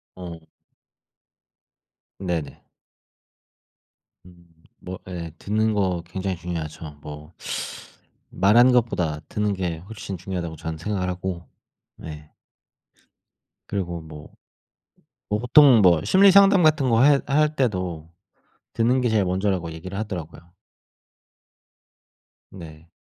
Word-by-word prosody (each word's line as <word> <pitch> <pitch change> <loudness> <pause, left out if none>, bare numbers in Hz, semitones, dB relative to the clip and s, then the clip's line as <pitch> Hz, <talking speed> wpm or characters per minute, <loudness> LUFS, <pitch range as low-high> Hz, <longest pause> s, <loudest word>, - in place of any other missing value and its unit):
어. 85 -2 -8 1.8
네네. 85 -6 -4 1.6
음. 90 -1 -18 0.4
뭐 95 +1 -7
예 85 -3 -6
듣는 110 +1 0
거 95 -4 0
굉장히 95 0 -3
중요하죠. 80 -3 -6
뭐 75 +2 -10 1.0
말하는 120 +6 +5
것보다 90 -11 +1
듣는 105 -1 -1
게 90 -4 -3
훨씬 100 +2 -8
중요하다고 85 -2 -5
전 80 +1 -6
생각을 95 +1 -2
하고 90 -1 -5 0.5
네. 75 -1 -10 1.4
그리고 90 -4 -3
뭐 75 -2 -11 1.0
뭐 105 - 0
보통 125 0 +6
뭐 85 -5 +4
심리 195 +1 +6
상담 195 -1 +6
같은 150 -4 +3
거 115 0 +4
해 145 0 +6
할 150 +2 +2
때도 90 - -2 0.6
듣는 120 +3 +2
게 125 - +1
제일 110 -3 +2
먼저라고 90 -2 -1
얘기를 95 +5 -7
하더라고요. 85 -4 -7 2.0
네. 80 -3 -12
95 Hz, 200 characters per minute, -23 LUFS, 85-110 Hz, 2.0 s, 보통